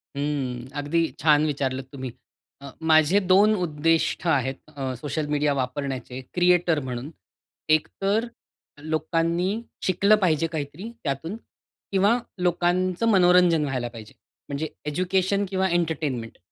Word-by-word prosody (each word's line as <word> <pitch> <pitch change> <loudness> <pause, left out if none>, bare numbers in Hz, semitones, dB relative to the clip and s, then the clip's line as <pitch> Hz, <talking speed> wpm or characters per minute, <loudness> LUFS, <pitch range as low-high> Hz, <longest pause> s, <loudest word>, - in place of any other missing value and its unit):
हम्म, 135 -4 -2
अगदी 155 +4 +1 0.2
छान 150 -1 +4
विचारलत 135 -3 -2
तुम्ही. 130 -3 -6 0.5
अ, 140 -1 -9 0.2
माझे 155 +6 +5
2 200 +3 +4
उद्दिष्ट 160 +3 0
आहेत 135 -3 +1 0.2
अ, 135 -2 -3
सोशल 145 +4 -3
मीडिया 150 -1 +1
वापरण्याचे 130 -1 -4
क्रिएटर 175 -3 +3
म्हणून 130 +1 -5 0.7
एकतर 200 +8 -1 0.6
लोकांनी 165 +6 0 0.2
शिकलं 200 +3 +4
पाहिजे 165 -2 +2
काहीतरी 155 +7 -5
त्यातून 160 +7 -3 0.6
किंवा 200 +5 +3 0.2
लोकांचं 180 +3 +1
मनोरंजन 180 -4 +5
व्हायला 130 -4 -2
पाहिजे. 115 -3 -11 0.4
म्हणजे 145 +3 -2 0.2
एज्युकेशन 185 +5 0
किंवा 190 -1 0
एंटरटेनमेंट 155 -9 -2
155 Hz, 115 wpm, -25 LUFS, 140-180 Hz, 0.7 s, माझे